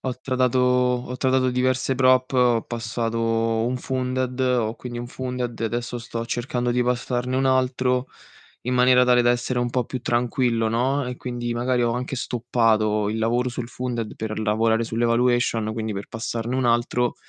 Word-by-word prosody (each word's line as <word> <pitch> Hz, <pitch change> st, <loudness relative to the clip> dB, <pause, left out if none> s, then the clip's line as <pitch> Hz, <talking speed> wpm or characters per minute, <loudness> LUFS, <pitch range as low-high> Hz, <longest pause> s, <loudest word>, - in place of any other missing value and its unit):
ho 130 Hz, -2 st, -3 dB
tradato 130 Hz, -1 st, +1 dB
ho 125 Hz, 0 st, +1 dB
tradato 130 Hz, 0 st, +2 dB
diverse 130 Hz, +1 st, +1 dB
prop, 130 Hz, 0 st, +3 dB
ho 125 Hz, -3 st, +3 dB
passato 115 Hz, 0 st, -3 dB, 0.5 s
un 125 Hz, +1 st, -1 dB
funded, 130 Hz, 0 st, -2 dB
ho 125 Hz, -4 st, +1 dB
quindi 120 Hz, -1 st, -7 dB
un 120 Hz, -, -5 dB
funded 125 Hz, -2 st, -4 dB
e -, -, 0 dB
adesso 120 Hz, +2 st, -3 dB
sto 115 Hz, 0 st, -5 dB
cercando 120 Hz, +1 st, -2 dB
di 125 Hz, +1 st, +2 dB
passarne 125 Hz, +1 st, -1 dB
un 135 Hz, -, +1 dB
altro, 130 Hz, 0 st, +1 dB, 0.6 s
in 125 Hz, +1 st, -1 dB
maniera 125 Hz, 0 st, +5 dB
tale 125 Hz, -1 st, +4 dB
da 120 Hz, -, +4 dB
essere 120 Hz, +1 st, -1 dB
un 120 Hz, 0 st, 0 dB
po' 125 Hz, 0 st, 0 dB
più 130 Hz, +2 st, -5 dB
tranquillo, 120 Hz, -1 st, +1 dB
no, 130 Hz, +5 st, 0 dB
e 125 Hz, -, -5 dB
quindi 120 Hz, -1 st, -4 dB
magari 125 Hz, +1 st, 0 dB
ho 120 Hz, -, +2 dB
anche 125 Hz, +3 st, -3 dB
stoppato 110 Hz, -4 st, +1 dB
il 110 Hz, +1 st, -2 dB
lavoro 120 Hz, +3 st, +1 dB
sul 120 Hz, -1 st, -5 dB
funded 120 Hz, -3 st, -4 dB
per 110 Hz, -1 st, -4 dB
lavorare 110 Hz, +1 st, +1 dB
sull' 115 Hz, +1 st, -2 dB
evaluation, 120 Hz, -2 st, +2 dB
quindi 110 Hz, -1 st, -3 dB
per 100 Hz, 0 st, -5 dB
passarne 115 Hz, +1 st, -4 dB
un 130 Hz, -1 st, +1 dB
altro 120 Hz, +1 st, +1 dB
125 Hz, 175 wpm, -23 LUFS, 115-125 Hz, 0.6 s, maniera